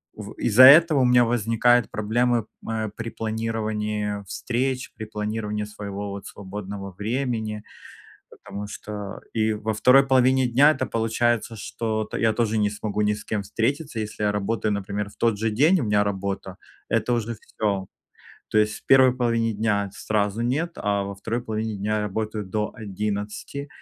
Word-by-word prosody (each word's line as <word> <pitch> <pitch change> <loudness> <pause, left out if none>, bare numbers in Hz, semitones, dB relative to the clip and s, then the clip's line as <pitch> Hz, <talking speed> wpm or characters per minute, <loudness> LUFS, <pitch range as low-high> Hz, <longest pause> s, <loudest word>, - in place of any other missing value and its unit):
в 105 0 -8
Из-за 120 +2 +5
этого 150 +2 +8
у - - +4
меня 125 -1 +5
возникают 115 0 +2
проблемы, 120 +2 +1 0.2
э, 110 -1 -2
при 115 0 -5
планировании 110 -2 -2
встреч, 125 +5 -2
при 110 - -6
планировании 105 0 -3
своего, 100 -1 -6
вот, 100 0 -7
свободного 100 0 -7
времени. 110 +1 -3 0.7
Потому 100 +1 -8
что 105 -1 -7
и 110 -1 +1
во 110 +1 -2
2 135 +5 +5
половине 130 0 +4
дня 140 +6 +5
это - - -2
получается, 115 0 0
что 110 +1 -3
т - - -5
я 110 -1 +3
тоже 110 -1 0
не 105 -1 +2
смогу 105 0 -3
ни 105 0 +2
с 105 - -7
кем 105 -2 -2
встретиться. 130 +4 -2
Если 105 0 -4
я 105 - +2
работаю, 105 +1 -1
например, 100 0 -3
в - - -19
тот 115 -3 +1
же 110 +1 0
день 155 - +4
у - - -1
меня 105 -1 +3
работа- 95 -1 -4 0.3
это 125 - +1
уже 115 0 -2
всё. 100 -3 -2 0.7
То 110 - +3
есть 105 0 +1
в - - -39
первой 130 -1 +6
половине 115 -2 +1
дня- 100 -2 0
сразу 105 +1 -1
нет. 150 +8 -1
А 100 -1 0
во 100 0 -5
второй 115 +4 -3
половине 110 -1 -3
дня 105 +2 -1
я - - 0
работаю 105 +1 -3
до 105 +2 -2
11. 105 +6 -4
110 Hz, 170 wpm, -24 LUFS, 105-120 Hz, 0.7 s, этого